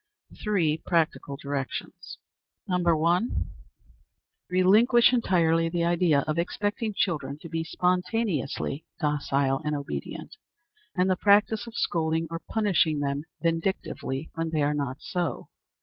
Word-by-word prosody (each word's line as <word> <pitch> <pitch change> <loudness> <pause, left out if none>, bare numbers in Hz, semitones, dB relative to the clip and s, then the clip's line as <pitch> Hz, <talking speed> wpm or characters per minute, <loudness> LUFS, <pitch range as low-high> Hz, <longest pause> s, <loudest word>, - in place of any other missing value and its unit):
Three 175 -8 +1
practical 160 -4 0
Directions. 140 -1 -5 0.5
1. 180 -1 0 1.7
Relinquish 215 +7 +5
entirely 165 -8 +2
the 170 0 -1
idea 170 -4 +3
of 155 +3 -2
expecting 205 +4 -2
children 145 -8 -1
to 160 - -10
be 165 0 -2
spontaneously 180 - -1 0.2
docile 140 -3 0
and 150 0 -1
obedient, 140 +1 -6 0.6
and 180 0 +2
the 185 - +3
practice 210 +4 +3
of 230 - -10
scolding 160 -3 0
or 165 - -3
punishing 185 -8 +2
them 140 +1 -2 0.2
vindictively 165 -4 -2
when 165 0 -2
they 155 -2 0
are 145 +1 +2
not 140 -3 -2
so. 175 -8 -3
165 Hz, 120 wpm, -27 LUFS, 150-185 Hz, 1.7 s, Relinquish